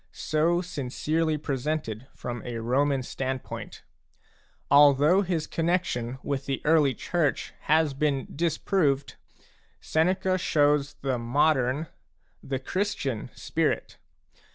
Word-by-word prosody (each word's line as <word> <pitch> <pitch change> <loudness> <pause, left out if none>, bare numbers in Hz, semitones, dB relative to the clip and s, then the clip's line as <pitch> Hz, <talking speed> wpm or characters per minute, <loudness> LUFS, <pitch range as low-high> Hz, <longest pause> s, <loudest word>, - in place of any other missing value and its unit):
so 165 +3 +3
sincerely 155 0 -1
presented 135 -4 -3
from 120 -2 -5
a 120 -1 -5
Roman 130 +4 +1
standpoint. 130 +1 -5 0.9
Although 145 +5 +6
his 170 -5 -1
connexion 160 -9 -1
with 140 -1 -3
the 135 -1 -1
early 150 -4 +4
Church 165 -1 -1
has 155 -1 +3
been 140 -1 0
disproved, 155 -3 0 0.6
Seneca 185 +3 +1
Jshows 145 -3 +2
the 130 -3 -1
modern, 130 +3 +2 0.6
the 135 -1 -3
Christian, 140 - -2
spirit. - - -2
145 Hz, 100 wpm, -27 LUFS, 130-160 Hz, 0.9 s, Although